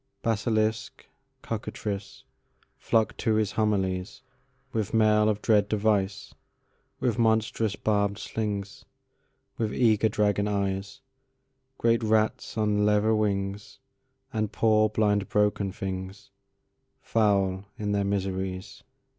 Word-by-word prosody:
Basilisk, 110 Hz, 0 st, -1 dB, 0.4 s
cockatrice, 105 Hz, -2 st, -5 dB, 0.6 s
Flocked 110 Hz, -1 st, +1 dB
to 110 Hz, -, +1 dB
his 110 Hz, -2 st, +1 dB
homilies, 95 Hz, -1 st, -1 dB, 0.5 s
With 110 Hz, 0 st, -1 dB
mail 105 Hz, -1 st, +4 dB
of 105 Hz, -1 st, -2 dB
dread 105 Hz, -3 st, +3 dB
device, 105 Hz, -2 st, 0 dB, 0.7 s
With 120 Hz, -2 st, 0 dB
monstrous 110 Hz, -1 st, +1 dB
barbéd 100 Hz, -1 st, 0 dB
slings, 105 Hz, -3 st, -4 dB, 0.8 s
With 110 Hz, -2 st, -1 dB
eager 110 Hz, -3 st, +3 dB
dragon 105 Hz, -1 st, +1 dB
eyes; 100 Hz, +3 st, -2 dB, 0.8 s
Great 115 Hz, 0 st, +2 dB
rats 110 Hz, 0 st, 0 dB
on 105 Hz, -1 st, +2 dB
leather 105 Hz, +1 st, +3 dB
wingsAnd 105 Hz, +1 st, -3 dB
poor 110 Hz, -1 st, +3 dB
blind 105 Hz, -2 st, +1 dB
broken 105 Hz, -1 st, +1 dB
things, 95 Hz, +1 st, -6 dB, 0.7 s
Foul 100 Hz, -3 st, +1 dB
in 105 Hz, -1 st, -2 dB
their 100 Hz, -1 st, +1 dB
miseries. 95 Hz, -1 st, -3 dB
105 Hz, 100 wpm, -27 LUFS, 100-110 Hz, 0.8 s, mail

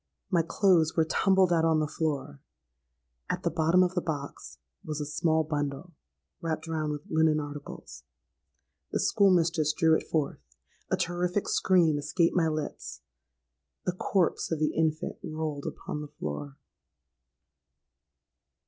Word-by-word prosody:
My 175 Hz, -3 st, +4 dB
clothes 165 Hz, -1 st, +3 dB
were 160 Hz, -, +3 dB
tumbled 190 Hz, +2 st, +3 dB
out 165 Hz, -1 st, +3 dB
on 160 Hz, -1 st, +3 dB
the 155 Hz, -, +1 dB
floor: 145 Hz, -2 st, -3 dB, 0.9 s
at -, -, -2 dB
the -, -, +1 dB
bottom 165 Hz, +3 st, +4 dB
of 180 Hz, 0 st, 0 dB
the 180 Hz, -, 0 dB
box 145 Hz, -4 st, -5 dB, 0.3 s
was 155 Hz, -1 st, -4 dB
a 150 Hz, -, -2 dB
small 160 Hz, +2 st, +1 dB
bundle, 145 Hz, +2 st, -3 dB, 0.5 s
wrapped 165 Hz, -1 st, -3 dB
round 155 Hz, -2 st, -1 dB
with 150 Hz, 0 st, -5 dB
linen 160 Hz, -1 st, +3 dB
articles. 145 Hz, -, -8 dB, 0.9 s
The -, -, 0 dB
school 200 Hz, -1 st, +4 dB
mistress 165 Hz, -4 st, +2 dB
drew 160 Hz, -1 st, +5 dB
it -, -, -3 dB
forth—a 155 Hz, -3 st, -4 dB
terrific 180 Hz, +3 st, -1 dB
scream 170 Hz, -6 st, +3 dB
escaped 165 Hz, +4 st, +1 dB
my 170 Hz, -3 st, +3 dB
lips—the 150 Hz, -, -4 dB, 0.9 s
corpse 180 Hz, 0 st, 0 dB
of 165 Hz, -, +1 dB
the 155 Hz, 0 st, 0 dB
infant 160 Hz, -1 st, -1 dB
rolled 155 Hz, -2 st, -4 dB
upon 150 Hz, -, -5 dB
the 150 Hz, -, -6 dB
floor! 75 Hz, -, -6 dB
160 Hz, 135 wpm, -28 LUFS, 150-170 Hz, 0.9 s, drew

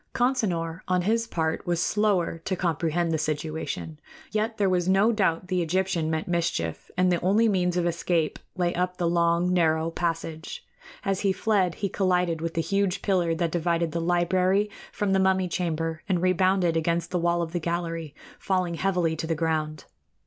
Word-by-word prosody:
Consinor, 190 Hz, -10 st, 0 dB
on 180 Hz, -1 st, +1 dB
his 230 Hz, +4 st, +1 dB
part, 160 Hz, -5 st, -2 dB
was 175 Hz, -1 st, +1 dB
slower 195 Hz, -4 st, +1 dB
to 185 Hz, +3 st, -2 dB
comprehend 170 Hz, -1 st, 0 dB
the 160 Hz, -, 0 dB
situation; 155 Hz, 0 st, -3 dB, 0.3 s
yet 220 Hz, +1 st, -1 dB
there 200 Hz, -, +2 dB
was 180 Hz, -1 st, +1 dB
no 195 Hz, +4 st, +4 dB
doubt 185 Hz, -5 st, 0 dB
the 180 Hz, -1 st, 0 dB
Egyptian 175 Hz, -1 st, 0 dB
meant 160 Hz, -1 st, -2 dB
mischief, 165 Hz, -, -2 dB
and 180 Hz, 0 st, +3 dB
the 175 Hz, -, +1 dB
only 205 Hz, +6 st, +3 dB
means 180 Hz, -3 st, +1 dB
of 175 Hz, -, +1 dB
escape 170 Hz, -2 st, 0 dB, 0.2 s
lay 175 Hz, -1 st, +1 dB
up 180 Hz, +1 st, -1 dB
the 175 Hz, -, 0 dB
long, 170 Hz, +1 st, +2 dB
narrow 160 Hz, -2 st, +2 dB
passage. 165 Hz, -, -4 dB, 0.4 s
As 195 Hz, -1 st, 0 dB
he 195 Hz, -, +2 dB
fled 190 Hz, -3 st, +1 dB
he -, -, +2 dB
collided 180 Hz, -4 st, 0 dB
with 165 Hz, 0 st, -3 dB
the 165 Hz, -, +2 dB
huge 195 Hz, 0 st, 0 dB
pillar 175 Hz, -4 st, +1 dB
that 165 Hz, -1 st, -1 dB
divided 170 Hz, -1 st, 0 dB
the 170 Hz, -, -2 dB
library 185 Hz, +4 st, +2 dB, 0.2 s
from 205 Hz, -2 st, -1 dB
the 190 Hz, -, +3 dB
mummy 190 Hz, -1 st, +2 dB
chamber 165 Hz, -2 st, -2 dB
and 180 Hz, -2 st, +2 dB
rebounded 185 Hz, -1 st, +2 dB
against 170 Hz, +1 st, 0 dB
the 180 Hz, -, 0 dB
wall 170 Hz, 0 st, +1 dB
of 160 Hz, -, -5 dB
the 175 Hz, -, -1 dB
gallery, 165 Hz, -2 st, -3 dB, 0.2 s
falling 185 Hz, -3 st, 0 dB
heavily 175 Hz, -1 st, 0 dB
to 160 Hz, -, -4 dB
the 165 Hz, -, 0 dB
ground. 155 Hz, -1 st, -2 dB
175 Hz, 180 wpm, -26 LUFS, 165-190 Hz, 0.4 s, no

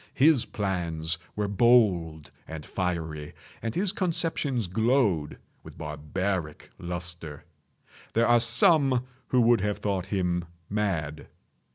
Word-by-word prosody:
His 140 Hz, -1 st, +4 dB
plans 85 Hz, -5 st, -2 dB, 0.2 s
were 105 Hz, -1 st, -1 dB
bold 100 Hz, -8 st, +3 dB, 0.2 s
and 80 Hz, -1 st, -7 dB
fiery, 80 Hz, -5 st, -3 dB, 0.3 s
and 115 Hz, -1 st, -3 dB
his 190 Hz, +1 st, +1 dB
conceptions 160 Hz, -, -1 dB
glowed 105 Hz, -, +1 dB, 0.2 s
with -, -, -13 dB
barbaric 75 Hz, +2 st, -3 dB
lustre. 85 Hz, -3 st, -4 dB, 0.7 s
There 115 Hz, +1 st, +3 dB
are 120 Hz, 0 st, +5 dB
some 130 Hz, -, +4 dB, 0.2 s
who 125 Hz, -, +3 dB
would 115 Hz, -2 st, +4 dB
have 105 Hz, 0 st, -1 dB
thought 95 Hz, -3 st, -2 dB
him 90 Hz, -3 st, -1 dB, 0.3 s
mad. 85 Hz, -8 st, -2 dB
95 Hz, 110 wpm, -27 LUFS, 80-120 Hz, 0.7 s, are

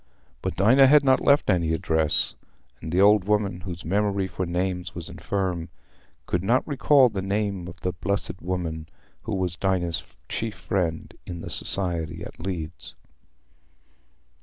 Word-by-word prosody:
But -, -, -3 dB
Dinah 125 Hz, +8 st, +6 dB
had 145 Hz, +1 st, +6 dB
not 130 Hz, -1 st, +4 dB
left 140 Hz, +1 st, +4 dB
any 85 Hz, -3 st, +2 dB
address, 80 Hz, -2 st, +1 dB, 0.5 s
and 80 Hz, -, -6 dB
the 90 Hz, -, +1 dB
old 100 Hz, -1 st, +6 dB
woman, 100 Hz, -3 st, 0 dB
whose 85 Hz, -1 st, -7 dB
memory 100 Hz, +2 st, +1 dB
for 95 Hz, -1 st, -4 dB
names 90 Hz, 0 st, -2 dB
was 85 Hz, -1 st, -6 dB
infirm, 90 Hz, 0 st, -3 dB, 0.6 s
could 90 Hz, 0 st, -1 dB
not 120 Hz, +6 st, +2 dB
recall 140 Hz, -2 st, +5 dB
the 100 Hz, -3 st, -3 dB
name 100 Hz, -2 st, -2 dB
of 90 Hz, -1 st, -11 dB
the 90 Hz, -, -1 dB
"blessed 90 Hz, 0 st, -3 dB
woman" 85 Hz, -3 st, -3 dB, 0.4 s
who 110 Hz, -, -2 dB
was 90 Hz, -2 st, -1 dB
Dinah's 90 Hz, -3 st, -1 dB
chief 110 Hz, -1 st, -3 dB
friend 85 Hz, -5 st, -2 dB
in 85 Hz, -1 st, -6 dB
the -, -, -7 dB
Society 85 Hz, -4 st, -2 dB
at -, -, -10 dB
Leeds. 85 Hz, -2 st, -6 dB
90 Hz, 150 wpm, -25 LUFS, 85-100 Hz, 0.6 s, Dinah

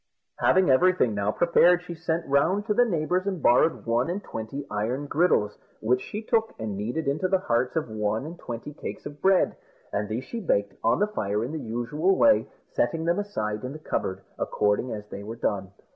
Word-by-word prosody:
Having 185 Hz, -6 st, +4 dB
everything 155 Hz, -4 st, +4 dB
now 100 Hz, 0 st, 0 dB
prepared, 175 Hz, +4 st, +4 dB
she 175 Hz, -, -7 dB
sent 165 Hz, 0 st, -2 dB
round 165 Hz, +9 st, +2 dB
to 215 Hz, -, +1 dB
the 245 Hz, +3 st, +4 dB
neighbours 180 Hz, -1 st, 0 dB
and 190 Hz, -3 st, -1 dB
borrowed 145 Hz, +4 st, +3 dB
one 120 Hz, +5 st, +1 dB
and 195 Hz, +4 st, -3 dB
twenty 115 Hz, +6 st, -6 dB
iron 115 Hz, +7 st, -1 dB
griddles, 145 Hz, -10 st, +1 dB, 0.2 s
which 125 Hz, +3 st, +1 dB
she 210 Hz, +2 st, -6 dB
took 225 Hz, 0 st, 0 dB
and 110 Hz, -2 st, -4 dB
kneaded 120 Hz, +11 st, -3 dB
into 150 Hz, +7 st, +1 dB
the 190 Hz, +1 st, +3 dB
hearts 125 Hz, -7 st, 0 dB
of 160 Hz, -4 st, 0 dB
one 110 Hz, +2 st, -2 dB
and 170 Hz, +2 st, -8 dB
twenty 120 Hz, +5 st, -6 dB
cakes -, -, -7 dB
of 145 Hz, -, -8 dB
bread, 190 Hz, -1 st, +3 dB, 0.4 s
and 105 Hz, +1 st, -1 dB
these 115 Hz, +4 st, -2 dB
she 235 Hz, -, -6 dB
baked 100 Hz, -, 0 dB
on 115 Hz, -, +3 dB
the 205 Hz, -, +3 dB
fire 105 Hz, -, -2 dB
in 130 Hz, -, -5 dB
the 160 Hz, -, -4 dB
usual 135 Hz, +11 st, 0 dB
way, 285 Hz, -1 st, +5 dB, 0.2 s
setting 165 Hz, -1 st, 0 dB
them 170 Hz, +3 st, +2 dB
aside 110 Hz, -, -3 dB
in 130 Hz, +2 st, -4 dB
the -, -, -7 dB
cupboard 95 Hz, -10 st, -3 dB, 0.2 s
according 105 Hz, +4 st, 0 dB
as 105 Hz, -1 st, -6 dB
they 100 Hz, -, -7 dB
were 110 Hz, +3 st, -6 dB
done. 100 Hz, -4 st, -2 dB
140 Hz, 205 wpm, -26 LUFS, 110-180 Hz, 0.4 s, way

